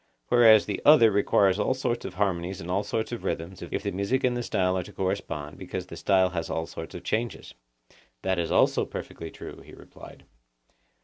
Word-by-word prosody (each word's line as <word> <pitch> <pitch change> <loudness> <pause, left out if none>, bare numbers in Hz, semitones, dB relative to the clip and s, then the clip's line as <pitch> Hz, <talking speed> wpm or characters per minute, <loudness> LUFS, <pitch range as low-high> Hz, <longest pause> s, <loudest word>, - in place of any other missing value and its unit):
Whereas 115 -3 +7
the 105 - -3
other 145 -7 +7
requires 100 -1 +3
all 130 - +1
sorts 120 -2 -2
of - - -6
harmonies 95 -1 -1
and 90 0 -6
all 100 +3 +1
sorts 110 +3 -3
of 120 - -5
rhythms, 90 +3 -4
if 85 - -4
the 100 - -2
music 100 +8 -1
and 125 -1 +2
the 120 - -2
style 95 -5 0
are 95 - 0
to - - -11
correspond, 85 -6 -4
because 95 -1 -5
the 85 - -10
style 95 +2 +2
has 85 -2 -3
all 80 - -2
sorts - - -8
of - - -8
changes. 115 +2 -3 0.7
That 95 -1 0
is 85 -1 -1
also - - +3
perfectly 80 - -7
true, - - -10
he - - -14
replied. - - -14
95 Hz, 200 wpm, -27 LUFS, 90-110 Hz, 0.7 s, Whereas